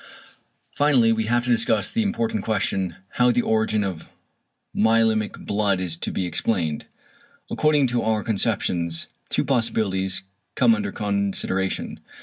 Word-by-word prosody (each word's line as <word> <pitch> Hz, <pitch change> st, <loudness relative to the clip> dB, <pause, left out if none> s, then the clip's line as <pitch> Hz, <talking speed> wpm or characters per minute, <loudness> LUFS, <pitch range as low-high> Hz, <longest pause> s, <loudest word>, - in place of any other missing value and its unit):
Finally 135 Hz, -6 st, +4 dB
we 110 Hz, -1 st, 0 dB
have 120 Hz, +2 st, +1 dB
to 125 Hz, -, 0 dB
discuss 115 Hz, -2 st, +2 dB
the 225 Hz, +3 st, -1 dB
important 225 Hz, +1 st, -1 dB
question, 95 Hz, -4 st, -1 dB, 0.2 s
how 125 Hz, 0 st, +5 dB
~the 120 Hz, 0 st, +2 dB
origin 110 Hz, -1 st, +1 dB
of 90 Hz, -5 st, -5 dB, 0.7 s
myelæmic 110 Hz, -1 st, +2 dB
blood~ 100 Hz, -2 st, +1 dB
is 90 Hz, -3 st, -1 dB
to 85 Hz, -, -3 dB
be 95 Hz, -, -2 dB
explained. 85 Hz, -3 st, -2 dB, 0.6 s
According 150 Hz, -2 st, +3 dB
to 120 Hz, 0 st, 0 dB
our 110 Hz, -2 st, 0 dB
conceptions 90 Hz, -6 st, -1 dB, 0.2 s
two -, -, 0 dB
possibilities 95 Hz, -7 st, 0 dB, 0.3 s
come 230 Hz, -, +5 dB
under 210 Hz, -2 st, -2 dB
consideration. 100 Hz, -2 st, -2 dB
110 Hz, 135 wpm, -23 LUFS, 95-120 Hz, 0.7 s, how